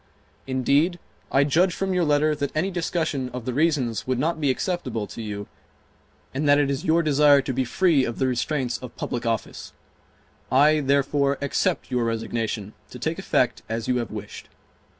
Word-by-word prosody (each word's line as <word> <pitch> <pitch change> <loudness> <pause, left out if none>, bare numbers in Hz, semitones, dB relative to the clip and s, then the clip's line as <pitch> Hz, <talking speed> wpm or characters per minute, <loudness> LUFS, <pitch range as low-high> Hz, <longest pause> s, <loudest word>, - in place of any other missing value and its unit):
Indeed, 140 +7 +2 0.3
I 135 - +4
judge 170 +6 +2
from 195 -1 -1
your 180 -1 +2
letter 150 0 +3
that 145 -2 -3
any 180 +6 0
discussion 165 -6 -2
of 125 -1 -7
the 125 - -2
reasons 135 -7 0
would 130 -1 0
not 160 +4 -1
be 145 - +2
acceptable 130 - -2
to 115 - -8
you 105 -2 -5 0.9
and 145 +2 0
that 145 - +6
it 145 -1 +2
is 135 - -3
your 165 +1 +3
desire 145 -1 +5
to 135 - -3
be 130 +1 0
free 155 +2 +2
of 120 -2 -3
the 135 - +1
restraints 130 0 -1
of 125 -2 -10
public 120 -1 -3
office. 115 -2 -3 0.8
I, 150 +4 +5
therefore, 140 0 +1
accept 140 - -1
your 125 -2 +1
resignation, 115 -2 -3 0.2
to - - -9
take - - -3
effect - - +1
as 115 0 -3
you 125 - +1
have 120 -2 -2
wished. - - -8
140 Hz, 180 wpm, -24 LUFS, 125-155 Hz, 0.9 s, that